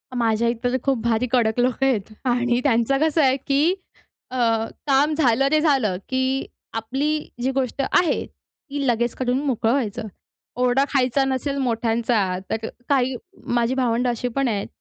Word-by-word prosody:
माझ्या 230 Hz, -1 st, +1 dB
इथं 235 Hz, -1 st, -1 dB
तर 260 Hz, -, +1 dB
खूप 275 Hz, -2 st, +1 dB
भारी 235 Hz, +1 st, +1 dB
कडक 235 Hz, -2 st, +2 dB
लोकं 255 Hz, +2 st, +1 dB
आहेत 225 Hz, -6 st, 0 dB
आणि 245 Hz, -1 st, +2 dB
त्यांचं 245 Hz, 0 st, +2 dB
कसं 320 Hz, 0 st, +2 dB
आहे, 265 Hz, -1 st, +3 dB
की 285 Hz, +6 st, +2 dB, 0.6 s
अ, 255 Hz, -, -4 dB, 0.5 s
काम 285 Hz, +3 st, +3 dB
झालं 270 Hz, -3 st, +3 dB
रे 310 Hz, -, +4 dB
झालं, 265 Hz, -, +2 dB
की 260 Hz, +1 st, 0 dB, 0.3 s
आपली, 275 Hz, +7 st, -2 dB
जी 260 Hz, +2 st, +1 dB
गोष्ट 265 Hz, 0 st, -1 dB
आहे, 330 Hz, +5 st, +1 dB
ती 280 Hz, -2 st, -7 dB
लगेच 240 Hz, 0 st, +1 dB
करून 255 Hz, 0 st, 0 dB
मोकळं 235 Hz, -4 st, +1 dB
व्हायचं. 235 Hz, -3 st, -1 dB, 0.5 s
ओरडा 250 Hz, +2 st, +3 dB
खायचा 265 Hz, 0 st, +2 dB
नसेल 270 Hz, +1 st, -1 dB
मोठ्यांचा 225 Hz, -6 st, 0 dB
तर, 225 Hz, 0 st, -2 dB, 0.2 s
काही 265 Hz, -2 st, +2 dB, 0.4 s
माझी 235 Hz, +1 st, +1 dB
भावंडं 245 Hz, -1 st, +1 dB
असे 240 Hz, +1 st, -3 dB
पण 275 Hz, -1 st, +1 dB
आहेत 205 Hz, -4 st, -1 dB
250 Hz, 160 wpm, -22 LUFS, 235-275 Hz, 0.6 s, रे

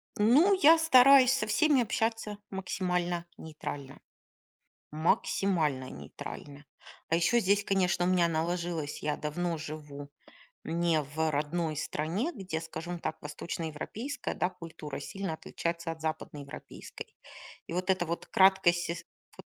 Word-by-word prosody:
Ну, 270 Hz, -, +5 dB
я 330 Hz, -4 st, +7 dB
стараюсь 270 Hz, -4 st, +7 dB
со 265 Hz, -5 st, 0 dB
всеми 290 Hz, +2 st, +4 dB
общаться 225 Hz, -1 st, -1 dB
максимально 180 Hz, -2 st, -2 dB
нейтрально, 145 Hz, -3 st, -7 dB, 0.9 s
максимально 155 Hz, -3 st, +1 dB
нейтрально. 140 Hz, -, -9 dB, 0.4 s
А 165 Hz, -, +3 dB
ещё 175 Hz, +8 st, +3 dB
здесь, 200 Hz, -1 st, +2 dB
конечно, 180 Hz, -3 st, +1 dB
у -, -, +2 dB
меня 180 Hz, -2 st, +4 dB
наложилось, 165 Hz, -1 st, -2 dB
я 150 Hz, -1 st, 0 dB
давно 165 Hz, +3 st, -2 dB
живу 150 Hz, -2 st, -8 dB, 0.6 s
не 165 Hz, -1 st, +1 dB
в 155 Hz, +3 st, -1 dB
родной 155 Hz, +2 st, -1 dB
стране, 165 Hz, -, -2 dB
где 185 Hz, -7 st, -4 dB
скажем 170 Hz, +2 st, -6 dB
так, 160 Hz, -, -3 dB
восточноевропейская, 165 Hz, -, -5 dB
да, 180 Hz, -, 0 dB
культура 165 Hz, -5 st, -8 dB
сильно 195 Hz, -3 st, -4 dB
отличается 170 Hz, +1 st, -4 dB
от 165 Hz, -1 st, -6 dB
западноевропейской. 150 Hz, -3 st, -7 dB, 0.5 s
И -, -, -7 dB
вот 180 Hz, +2 st, -1 dB
эта 185 Hz, -2 st, +1 dB
вот 170 Hz, +1 st, -4 dB
краткость 190 Hz, -2 st, +5 dB
сес 170 Hz, 0 st, -4 dB, 0.3 s
вот -, -, -13 dB
170 Hz, 125 wpm, -30 LUFS, 155-195 Hz, 0.9 s, я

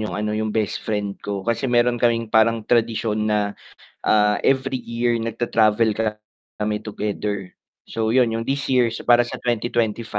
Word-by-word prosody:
'yong 110 Hz, -, -3 dB
ano 105 Hz, 0 st, -2 dB
'yong 110 Hz, 0 st, -1 dB
bestfriend 105 Hz, -1 st, -2 dB
ko 100 Hz, -2 st, -4 dB
kasi 115 Hz, +3 st, -1 dB
meron 120 Hz, 0 st, +2 dB
kaming 115 Hz, -2 st, +1 dB
parang 110 Hz, 0 st, +3 dB
tradisyon 110 Hz, -2 st, +1 dB
na 105 Hz, -1 st, 0 dB, 0.5 s
ah 105 Hz, -1 st, +3 dB
every 135 Hz, -1 st, +1 dB
year 120 Hz, 0 st, -1 dB
nagta-travel 115 Hz, -1 st, +1 dB
ka 110 Hz, -1 st, 0 dB, 0.6 s
mi 105 Hz, -, 0 dB
together, 105 Hz, -2 st, -4 dB, 0.4 s
so 110 Hz, 0 st, -1 dB
'yon 125 Hz, -3 st, +4 dB
'yong 115 Hz, +1 st, -3 dB
this 135 Hz, 0 st, -2 dB
year 125 Hz, -2 st, +4 dB, 0.2 s
para 120 Hz, 0 st, +5 dB
sa -, -, -6 dB
2025. 115 Hz, -1 st, -1 dB
115 Hz, 155 wpm, -22 LUFS, 105-120 Hz, 0.6 s, para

